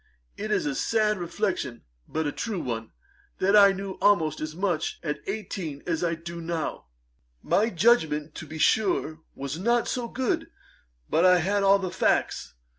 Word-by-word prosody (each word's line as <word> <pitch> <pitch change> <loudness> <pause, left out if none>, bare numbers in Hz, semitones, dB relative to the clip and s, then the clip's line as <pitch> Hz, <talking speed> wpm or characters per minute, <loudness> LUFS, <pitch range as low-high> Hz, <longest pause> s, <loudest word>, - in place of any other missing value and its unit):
It 215 - -5
is 215 - +1
a 295 - 0
sad 220 - +1
reflection, 175 - -2 0.2
but 160 0 -2
a 145 - 0
true 215 +1 -3
one, 115 -6 -4 0.5
that 195 +2 +3
I 200 -1 +8
knew 195 0 -6
almost 160 -7 +3
as 155 0 -4
much 180 -4 -1
at 150 -2 -2
eighteen 190 -8 -5
as 165 -1 -1
I 170 -1 +1
do 170 +1 -8
now. 165 - -3 0.6
My 215 +3 +2
judgement, 160 -7 +2
to - - -8
be 160 - -7
sure, 160 -3 +2 0.2
was 140 +3 -5
not 235 +4 +2
so 245 -2 -2
good; 320 +7 -2 0.6
but 165 - +2
I 180 0 +7
had 200 +4 +1
all 195 0 +6
the 190 -2 -4
facts. 180 - 0
185 Hz, 170 wpm, -26 LUFS, 160-210 Hz, 0.6 s, I